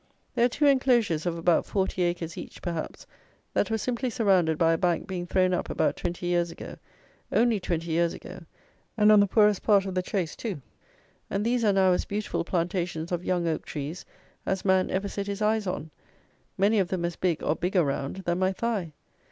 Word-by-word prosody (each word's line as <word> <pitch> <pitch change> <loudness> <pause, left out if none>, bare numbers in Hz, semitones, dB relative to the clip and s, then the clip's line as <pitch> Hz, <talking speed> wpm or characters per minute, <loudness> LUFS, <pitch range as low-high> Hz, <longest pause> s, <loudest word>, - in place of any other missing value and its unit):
There 235 - +3
are - - +3
two 290 +5 0
enclosures 240 - +3
of 170 -1 -1
about 165 0 +3
40 190 -2 -1
acres 175 -2 -1
each, - - -9
perhaps, 170 -3 -4 0.5
that - - +1
were 225 - +1
simply 250 +3 -2
surrounded 185 -9 +2
by 165 0 +3
a - - +1
bank 175 -2 +1
being 180 -2 -5
thrown 185 0 +2
up 180 - -2
about - - +1
twenty 175 0 -4
years 175 -1 +1
ago, - - -9 0.5
only 230 -2 +3
twenty 170 -2 -3
years 170 +1 +2
ago, - - -10 0.6
and 210 0 +6
on 210 - +7
the 200 - +4
poorest 210 0 +3
part 200 -3 +4
of 190 - -4
the 185 - +1
Chase, 180 -3 -2
too; 210 -10 -4 0.7
and 200 +2 -1
these 240 0 +1
are 210 - +4
now 190 -1 +4
as 180 - +1
beautiful 205 -3 -2
plantations 170 -1 -2
of 175 0 -2
young 175 -2 0
oak 160 - -1
trees 150 +4 -6 0.4
as 190 0 -2
man 190 -1 +3
ever 195 +2 -1
set 200 0 -4
his 200 0 -3
eyes 215 -1 +1
on; 160 -3 -4 0.7
many 205 +3 +3
of 190 - +1
them 175 -1 -2
as 170 -1 -3
big 175 -4 -1
or 155 - +1
bigger 180 +1 +1
round 135 0 -2
than 175 +1 0
my 190 0 +2
thigh! 195 -6 -2
185 Hz, 205 wpm, -27 LUFS, 170-205 Hz, 0.7 s, on